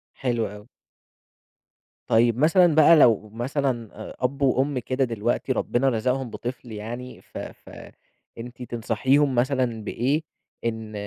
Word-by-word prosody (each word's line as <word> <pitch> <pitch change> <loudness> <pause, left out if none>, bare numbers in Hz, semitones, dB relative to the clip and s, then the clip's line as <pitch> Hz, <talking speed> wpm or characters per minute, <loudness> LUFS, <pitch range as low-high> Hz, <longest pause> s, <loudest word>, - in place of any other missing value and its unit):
حلو 120 -4 -1
أوي. 105 +1 -11 1.4
طيب 115 +1 +3
مثلًا 165 +2 +4
بقى 160 +2 +7
لو 115 -7 +4
مثلًا 125 -1 -2 0.2
آآ - - -10
أب 135 +2 -2
وأم 135 0 +2
كده 130 +2 -1
دلوقتي 120 +2 -1
ربنا 130 +1 +1
رزقهم 125 +2 -1
بطفل 120 +1 -7
يعني، 120 +4 -7
ف - - -12
ف - - -9 0.7
أنتِ 120 +2 -9
تنصحيهُم 125 +4 +1
مثلًا 125 -3 0
بإيه؟ 135 +9 0 0.4
إن 110 -2 -3
125 Hz, 125 wpm, -24 LUFS, 115-135 Hz, 1.4 s, بقى